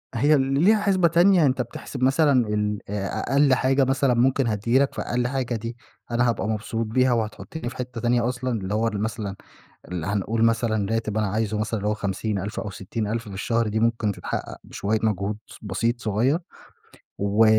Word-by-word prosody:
هي 145 +6 +4
ليها 140 +11 +3
حِسْبة 190 -4 +3
تانية، 175 +1 +5
أنت 130 -2 +2
بتحسب 125 +2 -6
مثلًا 135 -3 +4
الأ 105 -1 -2
أقل 140 -1 +5
حاجة 135 +1 +3
مثلًا 135 0 +2
ممكن 130 +2 +2
هتيجي 115 +4 +2
لك، 140 0 +1
فأقل 120 0 -1
حاجة 125 -2 -2
دي 115 +2 -5 0.3
أنا 120 +1 +2
هابقى 115 -2 -1
مبسوط 115 +1 -2
بيها 125 +3 +2
وهتحطني 120 +5 -3
في 130 - -11
حتة 125 -2 -5
تانية 120 0 +2
أصلًا، 125 0 -3
اللي 100 -4 -3
هو 110 +2 +1
أنا 105 -2 -2
مثلًا 105 -2 -3 0.5
ال 90 -2 -4
هنقول 105 +4 0
مثلًا 115 -2 +1
راتب 110 -1 -1
أنا 110 - +1
عايزه 105 +1 -1
مثلًا 110 +1 -1
اللي 105 +1 -2
هو 105 - +1
50 100 +1 -2
ألف 100 +3 -4
أو 105 - -5
60 100 +3 -4
ألف 115 +1 -3
في 100 - -8
الشهر، 115 +3 0
دي 110 +1 -1
ممكن 115 -2 +1
تتحقق - - -5
بشوية 110 +2 -1
مجهود 105 -1 0
س - - -13
بسيط 115 +4 -1
صغيّر 115 +8 +1 0.8
و 100 +3 +3
115 Hz, 190 wpm, -24 LUFS, 105-130 Hz, 0.8 s, تانية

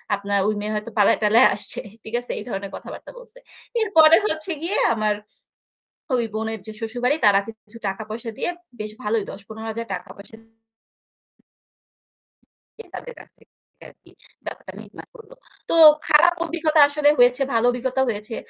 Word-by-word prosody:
আপনার 200 0 -2
ওই 215 - +1
মেয়ে 215 +1 -3
হয়তো 215 +2 -5
পালায়-টালায় 215 +3 +5
আসছে।" 210 - -9 0.2
ঠিক 220 - -11
আছে? 245 - -8
এই - - -7
ধরনের 195 -2 -5
কথাবার্তা - - -10
বলছে। - - -17 0.4
এরপরে 325 -7 +6
হচ্ছে 315 +2 -3
গিয়ে 350 +5 -2 0.2
আমার 215 -2 0 1.0
ওই 240 - +1
বোনের 220 0 -3
যে 220 - -6
শ্বশুরবাড়ি 245 +4 -1
তারা 200 -1 +6
কিছু 220 0 -13
টাকা 195 +3 -4
পয়সা 230 +2 -6
দিয়ে - - -2 0.3
বেশ 215 0 -5
ভালোই 215 0 0
৳১০-৳১৫,০০০ 220 -2 -7
পয়সা 200 +2 -13 2.4
দিয়ে 455 - -12
তাদের - - -8
কাছ - - -15
থেকে - - -27 0.4
আরকি - - -23 0.3
ব্যাপারটা - - -8
মিটমাট - - -13
করলো। 455 0 -14 0.4
তো - - 0 0.3
খারাপ 315 +3 +5
অভিজ্ঞতা 320 -2 0
আসলে 290 0 +2
হয়েছে, 245 +2 +4
ভালো 230 0 +2
অভিজ্ঞতাও 260 +2 -1
হয়েছে। 215 +1 -5
230 Hz, 145 wpm, -22 LUFS, 215-300 Hz, 2.4 s, এরপরে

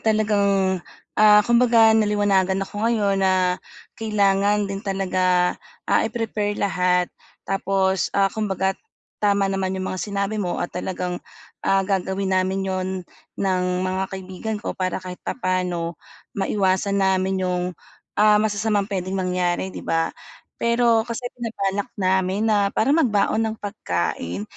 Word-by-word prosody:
talagang, 200 -4 +2 0.4
ah, 210 -1 +7
kumbaga, 235 -2 +5
naliwanagan 205 -3 +2
ako 205 +1 -7
ngayon 200 -4 +1
na 185 -1 +2 0.3
kailangan 205 -1 +2
din 195 0 -4
talaga, 185 -2 +1 0.3
ah, - - +3
i-prepare 210 -3 -2
lahat 180 -2 +1 0.3
tapos, 195 -1 0
ah, 195 -1 +3
kumbaga, 195 -3 0 0.5
tama 200 -1 +2
naman 190 -1 -1
yung 190 0 -3
mga 185 - -4
sinabi 200 +1 -2
mo 180 -3 -2
at 175 - -5
talagang, 180 -1 -3 0.4
ah, 195 0 +2
gagawin 190 0 -1
namin 190 +1 +1
'yon 185 -1 -2 0.5
ng 185 -2 0 0.2
mga 185 +1 -1
kaibigan 190 +4 -5
ko - - -4
para 185 -1 -2
kahit 185 -1 -8
papaano, 180 -5 -2 0.5
maiwasan 195 0 +1
namin 190 -1 +1
yung, 180 -1 0 0.5
ah, 210 0 +5
masasamang 210 -1 0
puwedeng 190 -1 -2
mangyari 180 0 0
'di - - -8
ba. 165 0 +1 0.5
Pero 235 -1 +3
kasi 235 +1 -5 0.2
binabalak 205 -4 -2
namin 190 +3 +1
na 205 -2 +3
parang 280 +8 +3
magbaon 215 -7 +2
ng 220 0 -3
pagkain. 90 - -3
195 Hz, 130 wpm, -23 LUFS, 185-210 Hz, 0.5 s, ah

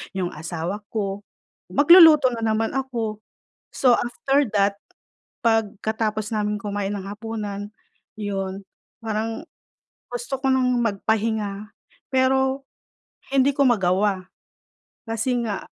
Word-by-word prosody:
'yong 180 -2 -2
asawa 170 +5 -4
ko, 200 -2 -2 0.5
magluluto 305 -3 +8
na 230 - -4
naman 220 0 0
ako. 230 -5 -3 0.5
So, 250 -3 +4
after 275 +3 0
that, 200 0 +2 0.7
pagkatapos 220 0 0
namin 210 0 -1
kumain 205 -1 -3
ng 195 -1 -5
hapunan, 205 -1 -5 0.5
'yon, 195 -1 -3 0.4
parang 225 +5 -3 0.7
gusto 245 +3 -3
ko 270 - 0
ng 250 -2 +2
magpahinga 210 -1 -1 0.4
pero 265 +1 +2 0.7
hindi 275 +1 +4
ko 280 - +4
magawa 190 -3 +1 0.8
kasi 225 +3 -1
nga 210 -3 -4
220 Hz, 105 wpm, -23 LUFS, 200-250 Hz, 0.8 s, magluluto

